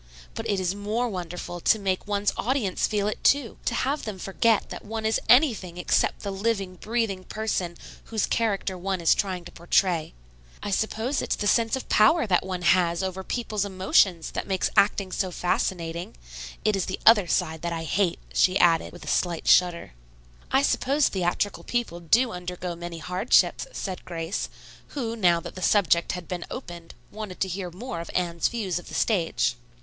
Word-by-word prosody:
But - - -5
it 200 - +1
is 185 0 0
more 210 +4 -1
wonderful 175 -3 -5
to 220 - +3
make 195 -1 -2
one's 205 0 0
audience 235 -6 0
feel 205 -2 0
it, 210 - -4
too. 280 -5 +2
To - - 0
have 280 +3 0
them 210 -3 -5
forget 205 +4 +1
that - - -7
one 220 +1 -5
is 220 - +2
anything 230 - +4
except 180 - +1
the 200 - -4
living, 195 -2 -2
breathing 220 -3 -2
person 185 -5 -3 0.3
whose 220 -3 -1
character 205 -4 0
one 190 +1 -2
is 165 - +4
trying 185 -4 -2
to - - -10
portray. 170 - +1 0.5
I 205 - -3
suppose 220 +7 0
it's - - -1
the 210 - -4
sense 225 +3 +3
of 265 - -6
power 235 +9 +4
that 185 -4 +2
one 185 -1 -4
has 170 0 +3
over 190 0 -3
people's 215 -2 -2
emotions 190 -3 +2
that - - -4
makes 190 -2 0
acting 200 -1 +3
so 185 0 -1
fascinating. 175 -1 -2 0.5
It 215 - +3
is 195 - -1
the 185 - -3
other 210 -5 +7
side 160 -1 0
that 170 - -2
I 165 -1 -3
hate," 175 +1 +1 0.2
she 185 +1 +3
added, 170 -3 +3
with 175 - -11
a - - -12
slight 175 -2 0
shudder. 175 - +3 0.6
"I 270 - +4
suppose 280 +1 +2
theatrical 190 +2 -1
people 235 -8 -2
do 230 +9 +3
undergo 180 -1 -5
many 170 0 -7
hardships," 180 +7 +2
said 190 - -5
Grace, 165 0 -4 0.5
who, 230 -4 -2
now 175 -6 +3
that - - -8
the 185 - -9
subject 180 -4 +3
had 180 -1 -6
been 180 -2 -4
opened, 175 -9 -8 0.2
wanted 210 -3 -7
to 190 - +2
hear 185 0 -4
more 180 +1 -6
of 170 - -7
Anne's 170 -2 +1
views 200 -7 -2
of - - -14
the - - -7
stage. 160 - +1
190 Hz, 185 wpm, -26 LUFS, 175-215 Hz, 0.6 s, other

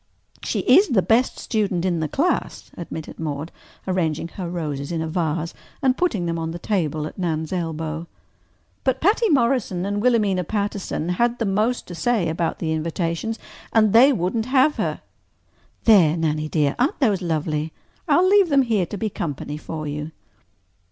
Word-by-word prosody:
"She - - -1
is 405 - +6
the 210 - +2
best 235 +3 +2
student 195 -6 -1
in 175 -3 +1
the 160 - -1
class," 325 - -1
admitted 160 -2 -7
Maude, 155 0 -4 0.4
arranging 170 -3 -1
her 180 -2 -6
roses 150 -5 -4
in 165 - -1
a 160 - -2
vase 165 -1 -2 0.3
and 260 -2 +2
putting 240 - 0
them 165 0 -2
on 160 0 -3
the 165 - -5
table 160 -6 -1
at 155 - -8
Nan's 160 -2 -2
elbow. 160 -1 -3 0.8
"But 260 -1 +1
Patty 430 - +3
Morrison 235 - +1
and 205 +1 -1
Wilhelmina 210 -6 +2
Patterson 200 -3 -2
had 235 +6 +1
the 230 - -1
most 215 +5 0
to 180 - -9
say 180 0 +1
about 165 +1 -1
the 160 -2 -2
invitations, 170 +7 -2 0.4
and 215 -2 +4
they 255 +5 +7
wouldn't 220 +1 -1
have 265 +3 +3
her. - - -2 0.8
There, 175 -8 +5
Nannie 155 -1 -1
dear, 150 -3 +1
aren't 270 +5 +1
those 210 -9 +2
lovely? 155 -2 -1 0.4
I'll 365 +1 +4
leave 395 -2 +5
them 280 -2 +4
here 215 -7 +1
to 205 - -6
be 215 +1 -2
company 145 -3 -4
for 155 0 -6
you." 150 +1 -4
180 Hz, 170 wpm, -22 LUFS, 160-230 Hz, 0.8 s, they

